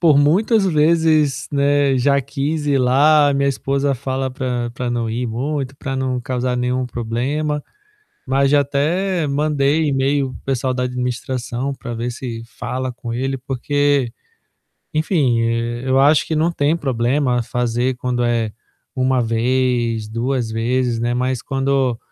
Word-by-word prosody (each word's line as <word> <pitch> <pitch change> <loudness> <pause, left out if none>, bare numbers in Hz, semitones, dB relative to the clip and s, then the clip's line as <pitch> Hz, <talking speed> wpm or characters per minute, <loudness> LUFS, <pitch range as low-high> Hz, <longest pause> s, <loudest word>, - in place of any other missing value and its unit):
por 155 -5 +5
muitas 195 +8 +3
vezes, 155 -3 +2
né, 140 -1 +2
já 140 +2 +3
quis 145 +3 -3
ir 140 -2 +3
lá. 145 +3 +4
Minha 140 0 +2
esposa 140 +1 0
fala 130 +1 -3
para 125 -2 -3
para 125 0 -4
não 120 -1 -1
ir 120 +3 -2
muito, 135 +3 -3
pra 135 -1 -4
não 130 -1 -1
causar 125 0 -2
nenhum 125 +1 0
problema, 135 +6 -2 0.7
mas 135 +1 +2
já 145 - +5
até 160 +6 0
mandei 145 +1 +1
e-mail 135 0 +1
para - - -9
o - - -33
pessoal 130 -1 -1
da 125 0 -1
administração 125 +1 -3
para 120 -3 -7
ver 120 +2 -3
se 120 -2 -6
fala 125 +2 -4
com 120 -1 -6
ele, 135 +3 -2
porque, 140 0 0 0.8
enfim, 150 -7 +2
eh, 115 +1 -1
eu 130 0 +3
acho 145 +2 +4
que 160 - -2
não 160 +3 +2
tem 155 -1 +1
problema 125 -2 0
fazer 120 +2 -1
quando 125 0 -1
é 115 -2 0 0.4
1 130 0 +1
vez, 120 -1 0
2 120 +1 -1
vezes, 120 +2 0
né. 120 +1 0
Mas 125 0 -1
quando 135 -2 0
130 Hz, 150 wpm, -19 LUFS, 120-145 Hz, 0.8 s, por